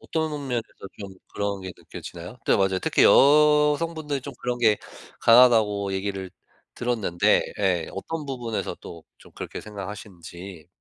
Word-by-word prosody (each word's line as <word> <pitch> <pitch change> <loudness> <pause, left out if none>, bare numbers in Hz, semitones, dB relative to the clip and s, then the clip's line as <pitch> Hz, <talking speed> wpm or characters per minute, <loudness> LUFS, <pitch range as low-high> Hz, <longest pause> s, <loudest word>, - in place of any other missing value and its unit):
어떤 160 -1 -2 0.2
면에서 120 -2 -1 0.4
좀 100 -2 -8 0.2
그런 100 -1 -2
게 95 0 -7
느껴지나요? 90 +6 -10
네 - - +4
맞아요. 95 -1 +1
특히 - - +2
여성분들이 150 +1 +4
좀 140 - -7
그런 125 0 -2
게 110 -3 +3 0.4
강하다고 110 -5 +5
얘기를 95 -1 -4 0.4
들었는데 110 -8 +1 0.2
예. 90 -5 0
어떤 155 +11 -5
부분에서 120 -5 -4
또 85 -1 -10 0.2
좀 - - -18
그렇게 - - -6
생각하시는지. 95 -4 -9
105 Hz, 320 characters per minute, -24 LUFS, 95-130 Hz, 0.4 s, 강하다고